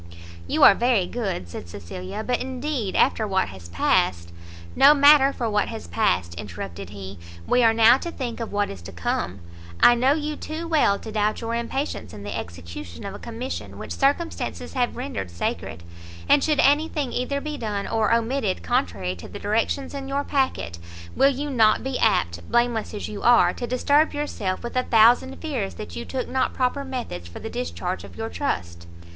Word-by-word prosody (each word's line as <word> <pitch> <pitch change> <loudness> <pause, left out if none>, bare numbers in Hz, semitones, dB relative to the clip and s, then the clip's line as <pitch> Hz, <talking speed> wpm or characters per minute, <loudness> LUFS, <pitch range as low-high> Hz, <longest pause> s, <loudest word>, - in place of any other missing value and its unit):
"You - - +1
are - - +10
very 235 -3 +2
good," 195 - -3
said 85 0 -8
Cecilia; 180 - -7
"but 250 -1 0
indeed 260 -5 -3
after 225 -4 +3
what 190 -1 +1
has 90 -3 -11
passed 85 0 +1 0.2
" 85 0 -16
"No 295 +2 +9
matter 285 -1 +7
for 240 -4 -3
what 210 -1 +1
has - - -7
passed," 85 0 0
interrupted 95 0 -7
he, 100 -2 -9 0.3
"we 250 - +3
are 225 -1 +6
now 230 +3 +6
to 340 - -5
think 250 -8 -5
of 230 - -4
what 205 0 0
is 95 - -9
to 85 +3 -9
come. 90 +1 -3 0.4
I 240 - +8
know 255 +3 +3
you 300 0 -2
too 315 +3 -6
well 295 -11 +3
to 220 - -8
doubt 210 0 0
your 230 0 -3
impatience 250 +5 -3
in 100 - -9
the 100 - -5
execution 85 0 -8
of - - -5
a - - -8
commission 240 +3 -6
which - - -8
circumstances 290 +5 -1
have 250 -2 0
rendered 250 - -4
sacred; 85 0 -4 0.4
and 285 - +5
should 305 -2 +1
any 290 +3 +4
thing 280 -5 -3
either 265 +3 -1
be 300 +1 -5
done 210 -6 -3
or 220 -1 +1
omitted 230 -3 0
contrary 100 - -1
to 85 - -9
the - - -8
directions 225 +7 -1
in 275 -1 -5
your 280 +1 -1
packet, 95 - -1 0.4
will 275 - +5
you 285 +2 -3
not 220 -4 +4
be 265 -1 -2
apt, 85 - +1
blameless 240 -3 +1
as 205 - -4
you 210 -1 -7
are, 240 0 +5
to 240 - -5
disturb 285 +5 +2
yourself 215 -11 -3
with 235 - -6
a 255 - +3
thousand 240 +3 +4
fears 260 -11 -4
that 215 - -8
you 235 - -5
took 260 -1 -3
not 260 0 0
proper 260 +2 0
methods 245 - -5
for 85 - -11
the 225 - -7
discharge 190 -7 -4
of - - -12
your 225 0 -4
trust?" 85 - -3
230 Hz, 195 wpm, -24 LUFS, -, 0.4 s, are